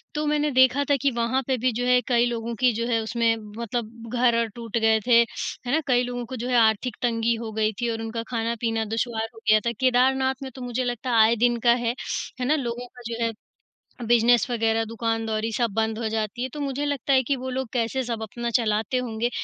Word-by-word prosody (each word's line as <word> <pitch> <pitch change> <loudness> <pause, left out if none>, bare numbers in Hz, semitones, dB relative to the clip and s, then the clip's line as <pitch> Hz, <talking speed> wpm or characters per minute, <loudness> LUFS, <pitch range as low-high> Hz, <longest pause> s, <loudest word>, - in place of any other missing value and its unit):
तो 300 0 -1
मैंने 300 0 +1
देखा 260 +2 +4
था 285 - +5
कि 275 - +2
वहाँ 235 +3 0
पे 260 -1 +1
भी 250 +2 +1
जो 245 +2 -2
है 250 0 +5
कई 240 -1 +3
लोगों 235 -1 -3
की 250 -1 +4
जो 230 +2 -2
है 230 -2 +1
उसमें 230 +1 +1 0.2
मतलब 230 0 -5
घर 235 -1 +3
टूट 230 -1 -4
गए 220 -1 +3
थे, 235 -1 +7
है 245 +2 -4
ना। 315 - +3
कई 245 -1 +3
लोगों 245 0 -4
को 255 +3 -7
जो 245 +1 -4
है 250 - 0
आर्थिक 220 +1 +2
तंगी 230 -1 +1
हो 225 -1 -6
गई 215 0 +1
थी 235 - 0
और 225 -1 -3
उनका 225 0 -4
खाना-पीना 225 -1 -1
दुश्वार 225 0 -2
हो 225 - -14
गया 215 0 +6
था। 235 - +1
केदारनाथ 260 +1 +3
में 265 - -6
तो 260 - -9
मुझे 245 +1 -2
लगता 245 +1 -3
है - - +2
आए 230 +2 +4
दिन 240 +1 +2
का 235 +1 +4
है, 240 -1 -1 0.5
है 250 - -1
ना, 300 +4 +3
लोगों 245 -3 -3
का 245 - -16
जो 230 0 -3
है 230 - +1 0.8
बिज़नेस 240 +1 +4
वग़ैरह 225 -1 +1
दुकानदारी 225 0 -2
सब 235 -3 +1
बंद 220 0 0
हो 225 -2 -2
जाती 220 +2 -3
है। 260 - -1
तो 295 - -6
मुझे 280 0 -2
लगता 280 -1 -1
है 260 -1 +5
कि 275 +2 -1
वो 260 +1 -5
लोग 255 -1 -3
कैसे 245 +2 0
सब 230 -2 -4
अपना 235 +2 -4
चलाते 220 +2 0
होंगे, 235 -1 -2
235 Hz, 235 wpm, -24 LUFS, 225-250 Hz, 0.8 s, थे